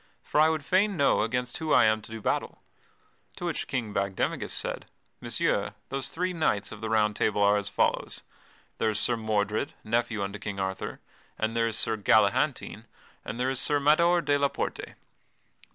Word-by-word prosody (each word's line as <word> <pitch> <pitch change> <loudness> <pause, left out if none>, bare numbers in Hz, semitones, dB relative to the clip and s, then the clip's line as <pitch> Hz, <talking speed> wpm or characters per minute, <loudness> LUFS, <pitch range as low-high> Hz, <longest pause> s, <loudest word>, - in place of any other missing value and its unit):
For - - 0
I 155 +1 +6
would 155 -3 -2
fain 195 +1 +2
know 140 - +3
against 125 +2 -2
whom 160 -1 0
I 120 - +6
am 110 0 +2
to - - -14
do 110 0 -6
battle." - - -1 0.8
To - - -6
which - - -2
King 115 -5 -3
Bagdemagus 100 -1 -1
said: - - -3 0.3
"Messire, - - -1
those 135 -1 -3
three 180 +4 -2
knights 130 - 0
of - - -9
the 110 - -3
Round 105 -1 +2
Table 105 -1 0
are 100 0 +5
as 100 -1 -2
follows - - 0 0.6
there 110 - +2
is 105 -1 +1
Sir 120 - +4
Mordred, 110 +5 -1
nephew 115 -1 0
unto 100 +1 -5
King 100 -2 -5
Arthur, 95 0 -4 0.4
and 110 +1 -1
there 115 0 +2
is 115 -1 -2
Sir 110 0 +2
Galahantine, 105 0 +2 0.4
and 115 - -6
there 130 +1 +1
is 135 - -2
Sir 145 -1 +2
Mador 170 +4 +4
de 145 -1 +1
la 140 - +3
Porte." - - -5
115 Hz, 185 wpm, -27 LUFS, 105-140 Hz, 0.8 s, I